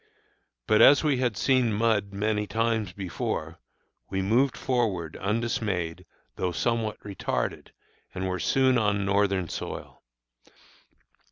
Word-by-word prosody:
But 110 - +4
as 140 +3 +7
we 145 -4 +2
had 125 -5 0
seen 130 -4 +2
mud 105 -2 +1
many 105 +1 -1
times 115 -3 0
before, 85 -3 -4 0.5
we 95 0 -1
moved 125 +7 +2
forward 105 - -1
undismayed, 100 -5 -2 0.3
though 90 - -1
somewhat 110 +3 -1
retarded, 100 -2 -3 0.5
and 95 +1 -2
were 90 0 -2
soon 130 +8 +3
on 100 -2 +1
Northern 100 -2 +1
soil. - - -7
105 Hz, 115 wpm, -27 LUFS, 95-115 Hz, 0.5 s, as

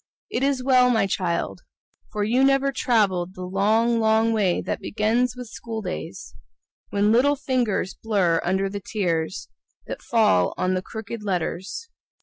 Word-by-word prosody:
It 240 - -1
is 275 -2 +1
well, 255 -1 +5
my 225 -4 +3
child. 180 -3 -2 0.5
For 210 -1 -1
you 240 +5 +2
never 275 0 +3
traveled 195 -8 +1
The 185 - -7
long, 215 +5 +2
long 220 +1 +3
way 200 -5 +1
that - - -3
begins 230 +4 0
with 250 0 -7
school 225 -1 -6
days, 180 -1 -6 0.6
When 205 +1 +2
little 270 +5 +4
fingers 255 -8 -1
blur 190 -7 +2
under 190 +2 0
the 200 +1 -5
tears 175 -4 -2 0.4
That - - -6
fall 215 - +2
on 185 0 0
the 185 - 0
crooked 220 +2 -7
letters. 190 - -3
215 Hz, 150 wpm, -24 LUFS, 190-240 Hz, 0.6 s, well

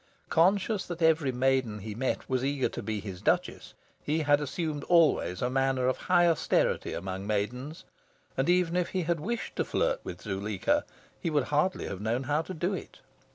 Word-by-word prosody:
Conscious 195 +4 +3
that 175 -1 -4
every 160 -4 +4
maiden 130 -3 +1
he 105 +1 -6
met 130 +4 -2
was 130 -1 0
eager 140 -1 +1
to - - -6
be 110 -1 -3
his 95 -3 -7
Duchess, - - -1 0.3
he 155 +2 0
had 145 -1 +3
assumed 150 0 -3
always 155 - +3
a 125 - +1
manner 135 -1 +1
of 130 - +1
high 175 -1 +3
austerity 165 -3 +1
among 95 +1 -5
maidens, 125 +9 -2 0.5
and 135 +5 0
even 180 -1 +3
if 180 -1 +1
he 185 -2 -1
had 170 0 0
wished 230 +9 -4
to - - +2
flirt - - 0
with - - -7
Zuleika 100 -1 0 0.3
he - - -2
would 150 -3 +2
hardly 165 +6 +1
have 95 - -5
known 115 +4 0
how 145 +3 +1
to 185 - -7
do 180 +5 -1
it. - - -7
145 Hz, 190 wpm, -29 LUFS, 120-170 Hz, 0.5 s, every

